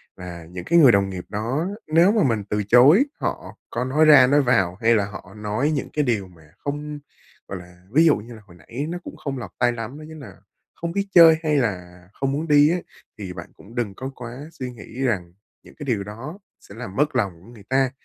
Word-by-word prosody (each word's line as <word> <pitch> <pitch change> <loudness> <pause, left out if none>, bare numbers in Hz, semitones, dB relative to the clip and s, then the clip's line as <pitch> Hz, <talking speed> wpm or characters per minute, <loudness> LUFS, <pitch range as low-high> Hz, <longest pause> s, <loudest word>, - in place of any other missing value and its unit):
là 85 -2 -9
những 90 +2 -8
cái 170 +1 +4
người 135 -6 +8
đồng 100 -2 +2
nghiệp 90 -2 -6
đó 120 - -2 0.2
nếu 165 +5 +5
mà 215 -6 +2
mình 115 -6 +1
từ 105 0 0
chối 130 - +6
họ - - -4
có 120 - -2
nói 150 +4 +3
ra 145 -5 +8
nói 145 +2 +4
vào, 100 -9 +2
hay 115 +1 +4
là 100 -2 +1
họ 100 -1 -10
nói 105 +8 -1
những 145 -3 -2
cái 150 - +1
điều 110 -7 -1
mà 80 -4 -20
không 145 +1 -5 0.5
gọi 95 - -5
là, 90 0 -14
ví 160 +5 +5
dụ 155 - +5
như 115 +4 -9
là 110 - -12
hồi 85 -3 -17
nãy 120 - -6
nó 175 - -3
cũng - - -9
không 135 -2 -5
lọt 110 -7 -7
tai 120 - +3
lắm, 120 +3 -6
nó 155 - -10
chính 160 0 -10
nà 140 - -11 0.4
"không 170 0 -4
biết 200 +2 -2
chơi 165 -2 +8
hay 150 -2 +2
là 90 -8 -2
không 135 +3 -2
muốn 155 +4 -2
đi" 145 0 +6
ấy, 175 +1 -1 0.3
thì 95 -3 -6
bạn 85 -2 -9
cũng 115 +4 -16
đừng 110 -5 -2
có 130 +5 -6
quá 125 +5 -9
suy 130 -6 -6
nghĩ 120 +2 -10
rằng 95 -10 -1 0.3
những - - -17
cái 145 - -8
điều 115 -7 -1
đó 125 - -8 0.2
sẽ 100 - -15
làm 115 -5 -8
mất 150 0 +1
lòng 100 -7 0
của - - -17
người 110 -4 -14
ta. 130 -1 +2
125 Hz, 245 wpm, -23 LUFS, 100-150 Hz, 0.5 s, người